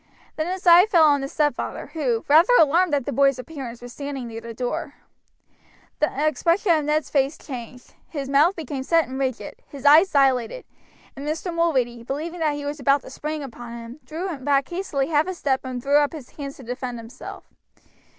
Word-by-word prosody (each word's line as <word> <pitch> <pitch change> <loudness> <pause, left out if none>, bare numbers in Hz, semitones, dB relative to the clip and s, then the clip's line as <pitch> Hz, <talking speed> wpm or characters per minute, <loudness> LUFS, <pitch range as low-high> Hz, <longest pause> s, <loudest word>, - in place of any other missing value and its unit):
Then 310 +1 -2
his 375 0 -5
eye 350 +3 +8
fell 345 -7 +5
on 290 -2 +4
his 275 - -5
stepfather, 295 -1 -2
who, 255 -8 -1
rather 325 +11 +6
alarmed 320 +1 +4
at 275 -4 -1
the - - -2
boy's 275 +1 +3
appearance, 255 -4 -8
was 245 0 -9
standing 280 -3 -5
near 225 0 -7
the 230 - -8
door. 245 +2 -4 1.0
The 300 - +2 0.2
expression 335 +5 +2
of 310 -3 +2
Ned's 300 0 0
face 275 +1 +1
changed, 250 -2 -9 0.2
his 280 -4 -5
mouth 295 +7 +4
became 290 -4 -5
set 325 +1 +2
and 260 +2 -6
rigid, 255 -6 -3
his 280 -1 -11
eyes 315 +6 +7
dilated, 270 - +1 0.5
and 275 - -8
Mr. 325 +3 -3
Mulready, 260 -9 0
believing 310 +8 -5
that 305 -2 +1
he 290 0 -6
was 290 +1 -4
about 275 +1 +3
to - - -12
spring 305 +2 -4
upon 240 -2 -9
him, 235 +4 -10
drew 340 +2 -4
back 275 0 +1
hastily 330 -6 -2
half 305 +1 +2
a 375 - -3
step 270 -5 0
and 255 -2 -5
threw 285 +1 +4
up 290 +1 +1
his 290 -6 -9
hands 275 -2 -7
to 265 - -12
defend 245 0 -5
himself. 230 +3 -10
285 Hz, 200 wpm, -23 LUFS, 255-315 Hz, 1.0 s, eye